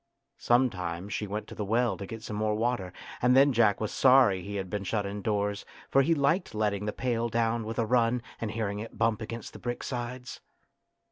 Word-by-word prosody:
Sometimes 100 -7 0
she 105 - -2
went 105 +2 -4
to - - -10
the 105 - -4
well 115 +1 +1
to 100 +1 -7
get 115 +1 -8
some 105 - -5
more 105 0 0
water, 110 -5 -1 0.3
and 125 +1 +4
then 140 0 +6
Jack 110 -4 +3
was 110 - -2
sorry 125 -8 +5
that 95 - -10
he 100 - -5
had 95 -2 -3
been 100 +1 -3
shut 105 +1 -1
indoors, 100 0 -2 0.3
for 135 - +5
he 165 +4 +3
liked 145 - +1
letting 105 -1 0
the 105 - -1
pail 120 0 -1
down 115 0 0
with 115 - -5
a 115 - +1
run 120 0 +2 0.2
and 115 - -3
hearing 105 -2 -2
it 115 +1 -8
bump 115 0 +1
against 115 +1 -6
the - - -10
brick 120 0 -4
sides. 125 0 -5
110 Hz, 215 wpm, -29 LUFS, 105-120 Hz, 0.3 s, then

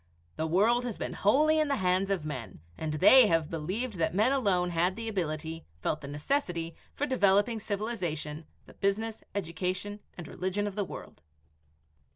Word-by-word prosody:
The 160 - -1
world 220 +9 +3
has 240 -4 -4
been - - -4
wholly 305 +9 +3
in 305 - +2
the 280 - +1
hands 185 0 +1
of 190 -6 -1
men, 125 - -6 0.2
and 155 - -3
they 245 - +7
have 165 -3 +1
believed 185 +7 -3
that 160 +1 +1
men 215 +6 +4
alone 190 -10 +2
had 175 +2 +1
the 230 0 -5
ability, 165 -5 -3 0.2
felt 150 - -1
the 140 - -7
necessity, 165 - -1 0.2
for 290 - 0
developing 220 -3 +3
civilization, 180 -8 -3 0.2
the - - -15
business, 215 +3 -1
education, 185 +3 -3 0.2
and 175 -3 -7
religion 190 +5 -2
of 205 - -3
the 205 0 -1
world." - - -10
190 Hz, 170 wpm, -30 LUFS, 165-220 Hz, 0.2 s, they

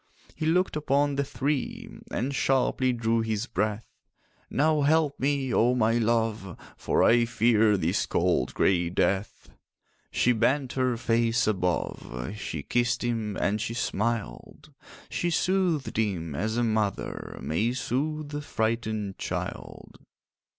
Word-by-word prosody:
He 155 - -3
looked 180 +2 +2
upon 145 -1 +1
the 140 0 0
three, 135 +1 -2 0.2
And 135 +4 -2
sharply 130 0 +2
drew 115 -1 +1
his 110 0 -1
breath: 105 -1 -2 0.6
'Now 155 +1 +2
help 150 0 +2
me, 135 -1 0
oh 120 +2 +3
my 115 -1 +2
love, 110 -5 0 0.2
For - - +1
I 120 0 +5
fear 110 -2 +3
this 90 +2 0
cold - - +1
grey 90 -3 +2
death.' 95 +3 -1 0.6
She 125 - +2
bent 125 +3 +1
her 130 -2 0
face 115 0 +1
above, 90 - -2
She 80 -8 -5
kissed 120 - 0
him 115 -4 -2
and 105 +1 0
she 115 +1 -3
smiled; 110 - -3 0.3
She 175 - -1
soothed 175 -2 0
him 90 -8 -1
as 110 +10 -2
a 120 - +2
mother 110 -3 -2
May 105 +10 0
sooth 145 +5 -2
a 145 - -3
frightened 110 -5 -2
child. - - -6
115 Hz, 130 wpm, -27 LUFS, 105-135 Hz, 0.6 s, I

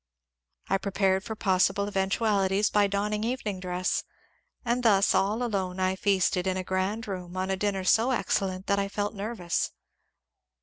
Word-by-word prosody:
I 195 - +1
pre 200 0 -4
pared 190 -1 +2
for 220 +1 -5
possible 195 +1 +2
eventualities 195 0 +1
by 205 -1 +4
donning 210 +2 -1
evening 225 -5 -2
dress, 180 0 -1 0.6
and 240 +1 +1
thus 200 -5 +4
all 205 +5 +1
alone 190 -5 -2
I 185 0 +1
feasted 190 -2 +1
in 185 0 0
a 185 - -2
grand 190 +5 -2
room 180 -2 -6
on 190 +1 -1
a - - +1
dinner 195 -1 -1
so 225 +6 +3
excel 210 -5 +1
lent 185 0 -6
that 200 0 +1
I 200 - 0
felt 205 +1 -2
nervous. 200 -4 -2
195 Hz, 170 wpm, -27 LUFS, 185-210 Hz, 0.6 s, by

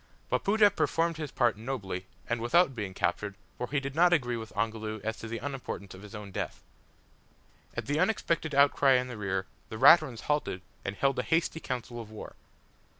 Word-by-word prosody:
Wapoota 205 0 +4
performed 165 0 +1
his 155 -2 -4
part 120 -5 +2
nobly 100 -7 -4 0.2
and 115 -1 -1
without 150 +5 +4
being 100 -5 -5
captured, 100 +3 -1 0.2
for 125 - -3
he 140 - +1
did 135 0 -5
not 175 +3 +5
agree 125 -8 +2
with 110 -1 -6
Ongoloo 110 0 -2
as 110 +1 -2
to 115 - -6
the 115 +1 -4
unimportance 130 -8 -5
of 95 - -11
his 105 +1 -10
own 105 -1 -8
death! - - -4 1.1
At - - -3
the 145 +2 0
unexpected 165 -8 +1
outcry 140 -1 +5
in 125 0 +2
the 125 - -6
rear 95 -3 -2 0.2
the 110 - -6
Raturans 130 -2 +6
halted, 145 -11 -1 0.2
and 100 - -3
held 135 +4 +1
a - - +3
hasty 165 0 0
council 120 -4 -5
of 110 - -11
war. 110 - -9
120 Hz, 190 wpm, -30 LUFS, 110-145 Hz, 1.1 s, Raturans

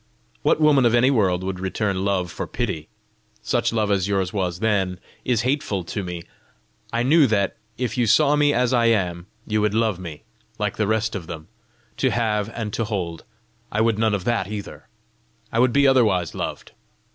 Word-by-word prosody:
What - - +2
woman 150 -4 +5
of 120 - +3
any 125 +3 +4
world 95 -7 +2
would 95 -1 -3
return 95 0 -1
love 95 -3 0
for - - -5
pity? 80 -1 -3 0.6
Such 120 +2 +1
love 110 -2 0
as 100 -1 +1
yours 95 -2 0
was 90 -4 -2
then, 95 -5 0 0.2
is 120 -3 +1
hateful 125 -8 -1
to 100 +4 -4
me. 90 -2 -5 0.7
I 115 +1 0
knew 145 +2 +5
that, 100 -3 +1 0.2
if 125 0 -2
you 120 - +2
saw 145 +7 +5
me 145 0 +3
as 125 -2 +1
I 120 -2 +3
am, 90 -5 0 0.2
you 110 -1 0
would 105 0 +1
love 110 -5 +1
me 85 -5 -8 0.3
like - - -2
the 105 - +1
rest 110 +1 0
of 90 -5 -5
them 80 +1 -8 0.5
to 130 - +2
have 110 -3 0
and 110 -3 -4
to 115 - -1
hold: 90 -6 -4 0.5
I 105 - +1
would 110 -1 +2
none 110 -2 +2
of 95 - -4
that 115 -4 0
either! 105 -1 -7 0.6
I 115 - 0
would 125 0 +4
be 140 +2 +4
otherwise 105 - +3
loved! - - -5
105 Hz, 190 wpm, -23 LUFS, 95-120 Hz, 0.7 s, woman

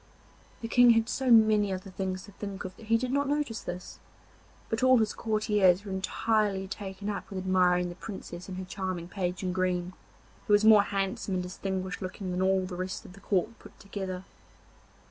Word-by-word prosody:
The 230 - -3
King 245 +1 +6
had 225 0 +2
so 265 +1 -1
many 215 -3 +5
other 185 +1 -5
things 185 -1 -3
to 205 - -13
think 200 0 -6
of 185 0 -7
that 220 - -14
he 230 +1 +4
did 250 +2 -2
not 280 +1 +1
notice 290 -6 -1
this, 180 0 -7 0.7
but 225 - -2
all 255 0 +6
his 220 -2 +1
courtiers 210 -4 +2
were 200 - -6
entirely 195 +1 0
taken 195 0 -6
up 210 - -4
with 195 - -6
admiring 180 -1 +2
the - - -6
Princess 185 -2 -8
and 185 - -5
her 185 - -5
charming 185 -2 -4
Page 180 0 -3
in 180 -1 -1
green, 185 -1 -1 0.5
who 210 - +3
was 205 +1 +5
more 215 -2 +8
handsome 195 -1 -2
and 180 - -1
distinguished 185 0 -4
looking 185 0 -5
than 180 +1 -1
all 190 0 +2
the 185 -1 -6
rest 185 +1 -4
of - - -12
the 200 - -14
court 205 +4 -1
put - - -15
together. 190 -2 -5
195 Hz, 200 wpm, -29 LUFS, 185-215 Hz, 0.7 s, more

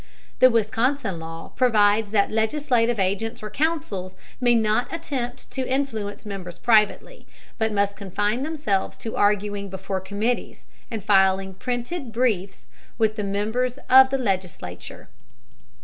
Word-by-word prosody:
The 255 - +8
Wisconsin 230 - 0
law 165 0 -8
provides 215 -3 +3
that 205 -1 +2
legislative 235 0 +1
agents 215 +5 -1
or 215 - -6
counsels 285 - -2 0.2
may 240 -2 +4
not 220 +1 +1
attempt 265 -7 -5
to 260 -1 -3
influence 225 -7 -2
members 190 -4 -7
privately, 225 - +2 0.3
but 220 0 +1
must 200 -1 +1
confine 205 +4 -1
themselves 290 -10 -1
to 225 - -6
arguing 205 -1 +1
before 190 0 -4
committees 210 +6 -3 0.2
and 220 -3 -5
filing 190 -1 +3
printed 245 - -4
briefs 215 -5 -1 0.3
with 220 -1 +2
the 210 - -3
members 220 +6 -1
of 265 0 +9
the 270 - 0
legislature. 185 - -4
220 Hz, 130 wpm, -24 LUFS, 200-250 Hz, 0.3 s, of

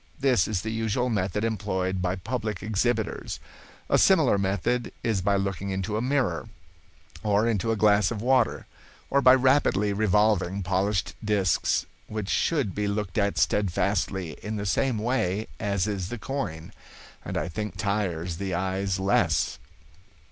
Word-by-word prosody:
This 130 -9 +3
is 100 -4 -2
the 110 - -3
usual 115 +2 -1
method 100 0 -1
employed 95 -4 -1
by 90 0 0
public 110 -1 -4
exhibitors. 110 +1 -1 0.5
A - - +3
similar 100 - +4
method 100 +5 0
is 110 -5 0
by 100 +2 +2
looking 100 0 -2
into 95 +2 -2
a 110 - 0
mirror, 130 -3 0 0.7
or 105 +1 +2
into 115 0 0
a - - +1
glass 105 -2 +4
of 115 - -4
water, 125 +1 +2 0.5
or 140 - +4
by 130 -1 +8
rapidly 130 -6 +3
revolving 100 -2 +2
polished 95 +1 0
disks, 100 -5 +1 0.2
which 105 -2 -4
should 140 - +1
be 105 0 -1
looked 100 -3 -2
at 100 0 0
steadfastly 95 -2 0
in 105 +2 -4
the 100 -1 -3
same 115 +5 +1
way 110 -3 0
as 100 -3 0
is 100 -4 -3
the 120 - -4
coin, 105 - -5 0.5
and - - -4
I 75 - -1
think 95 +2 -5
tires 95 -5 -1
the 95 -2 -2
eyes 95 +1 -1
less. 90 -6 +1
105 Hz, 150 wpm, -26 LUFS, 95-110 Hz, 0.7 s, by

